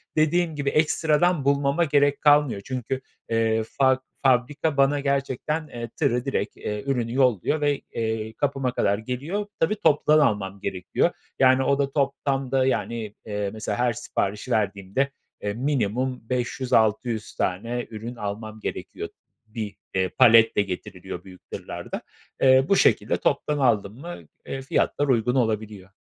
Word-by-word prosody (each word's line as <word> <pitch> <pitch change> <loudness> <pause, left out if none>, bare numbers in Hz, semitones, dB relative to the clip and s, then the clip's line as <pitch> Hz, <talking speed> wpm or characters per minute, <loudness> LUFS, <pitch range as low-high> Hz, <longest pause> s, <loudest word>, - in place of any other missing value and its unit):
dediğim 160 +1 +2
gibi 140 -1 -1
ekstradan 155 +1 +2
bulmama 140 +3 +2
gerek 145 -2 +2
kalmıyor. 145 -8 +4
Çünkü, 130 0 -3 0.3
eee, 115 -1 +2
fab 130 +3 +2 0.3
fabrika 135 +3 +2
bana 140 +1 +4
gerçekten, 140 +3 -1
eee, 120 -4 -6
tırı 125 +2 +1
direkt, 135 -6 -2
eee, 105 0 -4
ürünü 120 -4 -1
yolluyor 130 - +2
ve, 145 -1 +1
eee, 110 -1 -2
kapıma 135 0 -1
kadar 100 -4 +1
geliyor. 135 - -3
Tabii, 165 +6 +2
toptan 155 -5 +4
almam 100 -8 +1
gerekiyor. 95 -3 0 0.3
Yani, 130 0 +5
o 140 +1 +2
da 140 -1 0
toplamda 135 -2 0
yani, 115 -5 -2
eee, 105 -2 -2
mesela 105 -1 -3
her 120 -1 +2
siparişi 105 +2 -3
verdiğimde, 100 +4 0 0.3
eee, 105 0 -2
minimum 125 0 -1
500, 125 +1 -2
600 110 0 +1
tane 115 +7 -2
ürün 115 +2 -7
almam 110 0 -5
gerekiyor, - - -5 0.4
bir, 110 -1 -6 0.2
eee, 95 -1 +1
paletle 115 -2 +6
getiriliyor 90 -2 -6
büyük 95 -2 -15
tırlarda. - - -6 0.4
Eee, 130 0 +6
bu 195 - +5
şekilde - - +3
toptan 150 - 0
aldım 110 -7 +2
mı, 175 +4 -7 0.3
eee, 135 - -5
fiyatlar 145 +2 0
uygun 125 -1 +2
olabiliyor. 110 -5 -1
125 Hz, 140 wpm, -25 LUFS, 110-140 Hz, 0.4 s, paletle